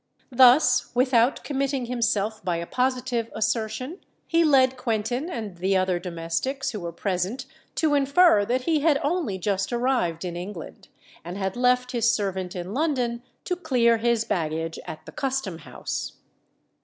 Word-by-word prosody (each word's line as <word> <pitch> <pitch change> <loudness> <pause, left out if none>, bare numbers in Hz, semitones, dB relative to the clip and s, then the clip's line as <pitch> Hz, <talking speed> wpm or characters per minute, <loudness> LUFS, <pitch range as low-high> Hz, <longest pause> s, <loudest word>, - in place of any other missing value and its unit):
Thus, 250 0 +5
without 250 0 +3
committing 275 -2 -1
himself 225 -3 -1
by 180 -2 0
a 170 - -4
positive 250 0 -1
assertion, 220 - -2 0.3
he 335 0 +3
led 265 -4 +4
Quentin 245 +4 -2
and 215 - -6
the 190 +2 +1
other 185 -1 +1
domestics 180 +11 -3
who 215 - -5
were 170 -2 -5
present 190 +8 -2 0.3
to 310 -2 +2
infer 280 - +5
that 245 +5 0
he 315 +2 +2
had 295 -1 +3
only 295 - -1
just 195 +2 -1
arrived 235 -9 0
in 175 -1 -4
England, 175 -1 -8 0.4
and 175 +3 -6
had 190 -1 -2
left 250 0 +2
his 235 -2 +2
servant 190 -4 -1
in 180 +2 -5
London 255 -5 0 0.2
to 360 - -1
clear 240 -9 +2
his 230 0 +1
baggage 165 -1 -2
at 155 - -8
the - - -10
Custom 265 -11 -3
House. - - -5
235 Hz, 155 wpm, -25 LUFS, 190-265 Hz, 0.4 s, Thus